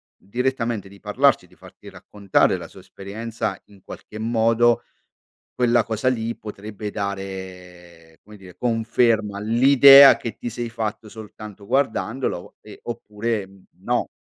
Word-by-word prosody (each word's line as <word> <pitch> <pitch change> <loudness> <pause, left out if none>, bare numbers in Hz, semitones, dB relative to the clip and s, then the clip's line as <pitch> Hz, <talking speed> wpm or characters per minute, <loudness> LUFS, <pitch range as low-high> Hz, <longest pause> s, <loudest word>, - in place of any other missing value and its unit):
direttamente 120 -2 -3
di 100 0 -17
parlarci, - - +2
di - - -23
farti - - -15
raccontare 100 -2 0
la - - -8
sua - - -15
esperienza, 105 +1 -6
in 100 -2 -20
qualche 105 - -11
modo, 115 +1 +2 0.7
quella 120 -1 +2
cosa 110 +3 -1
lì 115 -2 -2
potrebbe 105 0 -8
dare, 90 -4 -8
come 105 0 -15
dire, 95 -3 -15
conferma 115 -3 0
all'idea 135 +5 +7
che 115 - -6
ti 120 - -6
sei 120 +1 -5
fatto 110 -1 -5
soltanto 105 -1 -11
guardandolo 130 -5 -2
e 105 - -13
oppure 110 -2 -4 0.3
no. - - -1
110 Hz, 125 wpm, -22 LUFS, 100-120 Hz, 0.7 s, all'idea